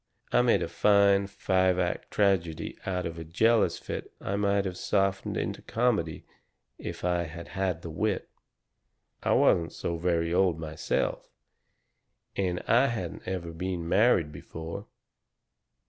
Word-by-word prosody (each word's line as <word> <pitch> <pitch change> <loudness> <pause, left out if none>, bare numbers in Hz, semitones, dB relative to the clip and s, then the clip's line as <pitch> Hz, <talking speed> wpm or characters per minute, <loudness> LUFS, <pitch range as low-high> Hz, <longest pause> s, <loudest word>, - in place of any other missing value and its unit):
I 120 - +5
made 125 -1 +3
a - - -2
fine, 100 +3 +4
five 95 -2 +1
act 90 -1 -1
tragedy 85 -6 +1
out 90 -2 -1
of 85 0 -5
a - - -5
jealous 110 +8 +3
fit - - -6
I 100 - -2
might 100 -1 +1
have 95 -2 -3
softened 95 +1 0
into - - -3
comedy 105 -10 0 0.5
if - - -6
I 90 -1 +1
had 85 +2 -9
had 95 -3 -2
the 85 - -6
wit. 100 +5 -1 0.9
"I - - +2
wasn't 85 -1 +3
so 85 -1 -3
very 85 -1 0
old 90 -3 +3
myself, 80 0 -2 1.1
and 90 -2 -1
I 125 +4 +5
hadn't 95 -9 -4
ever 90 -3 -3
been 85 0 -3
married 95 -5 +3
before. 80 +6 -7
90 Hz, 140 wpm, -28 LUFS, 85-100 Hz, 1.1 s, I